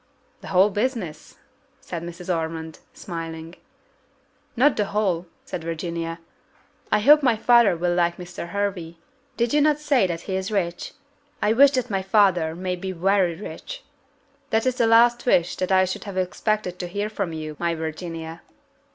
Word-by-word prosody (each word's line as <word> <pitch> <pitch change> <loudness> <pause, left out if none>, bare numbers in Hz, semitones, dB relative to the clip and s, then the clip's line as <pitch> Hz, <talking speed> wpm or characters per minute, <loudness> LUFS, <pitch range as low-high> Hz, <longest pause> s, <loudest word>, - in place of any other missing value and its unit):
"The - - -10
whole 195 +2 +4
business?" 205 - -3 0.4
said 170 -2 -6
Mrs. 175 +1 -4
Ormond, 160 -1 -5
smiling. 165 -1 -7 1.0
"Not 265 +4 +4
the 210 - 0
whole," 195 -4 -1 0.2
said 170 - -6
Virginia; 165 0 -4 0.7
"I - - +3
hope 295 +6 +7
my 250 -5 +3
father 235 -4 +5
will 175 +1 0
like 175 -1 +1
Mr. 175 -1 -8
Hervey. 185 -4 -3 0.4
Did 235 +2 0
not 300 0 +4
you - - -17
say 270 -10 +3
that 170 -1 -4
he 190 - -4
is 190 0 -2
rich? 175 -5 -2 0.5
I 210 - +2
wish 275 +4 +7
that 255 -3 -1
my 195 -1 0
father 190 -5 +2
may 180 +1 -3
be 190 +1 -5
very 185 -1 +1
rich." - - -8 0.7
"That 225 +2 +1
is 255 -1 0
the 230 - +4
last 240 +2 +4
wish 175 -7 +3
that 185 +1 -2
I 185 0 +5
should 185 - -5
have 200 -2 -6
expected 185 0 -1
to 180 - -3
hear 205 +4 -3
from 200 -5 -3
you, 155 -1 -6
my 170 -1 0
Virginia." 160 +1 -6
185 Hz, 170 wpm, -23 LUFS, 170-215 Hz, 1.0 s, hope